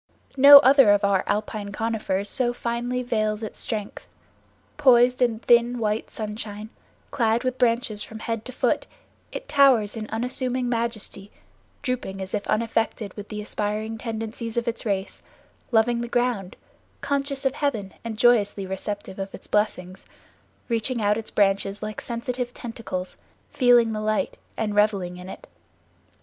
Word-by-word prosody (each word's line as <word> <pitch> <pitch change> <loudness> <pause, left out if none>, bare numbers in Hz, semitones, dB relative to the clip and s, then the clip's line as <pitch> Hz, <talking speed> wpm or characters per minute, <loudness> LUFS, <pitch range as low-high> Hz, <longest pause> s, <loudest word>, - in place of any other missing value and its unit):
No 280 +1 +11
other 270 -4 +6
of 205 - +1
our 200 -2 +2
alpine 210 -1 -2
conifers 210 -2 -2
so 240 +2 0
finely 240 +1 -2
veils 215 -2 -1
its 215 - -6
strength; 210 -3 -4 0.7
poised 250 -3 +4
in 235 -3 +2
thin, 240 +1 +3
white 215 -1 -1
sunshine, 210 0 -6 0.4
clad 230 -1 +1
with 255 0 -2
branches 230 -3 +1
from 220 - -7
head 225 -1 -4
to 255 - -7
foot, 255 - 0 0.4
it - - -7
towers 270 -8 +4
in 215 -1 -5
unassuming 250 +2 -2
majesty, 230 -4 -3 0.5
drooping 240 -6 -3
as 190 0 -6
if 205 -1 -2
unaffected 225 -2 -1
with 205 -1 -9
the 210 -1 -5
aspiring 215 +2 -3
tendencies 225 0 -5
of 235 0 -1
its 235 0 -3
race, 195 -1 -2 0.5
loving 235 +1 +3
the 240 - -3
ground, 235 -6 -1 0.5
conscious 280 -1 -2
of 265 - +2
heaven 230 -10 -2
and 225 -2 -5
joyously 210 -4 +3
receptive 190 +1 -5
of 195 0 -5
its - - -12
blessings, 190 -3 -1 0.6
reaching 235 +1 -1
out 210 -1 +2
its 225 0 -5
branches 200 0 +1
like 215 0 -5
sensitive 245 +1 -4
tentacles, 225 -6 -6 0.3
feeling 245 -3 +4
the 215 - -3
light 215 0 -1 0.2
and 215 -2 -1
reveling 200 -4 +1
in 180 +1 -9
it. - - -10
225 Hz, 150 wpm, -24 LUFS, 210-245 Hz, 0.7 s, No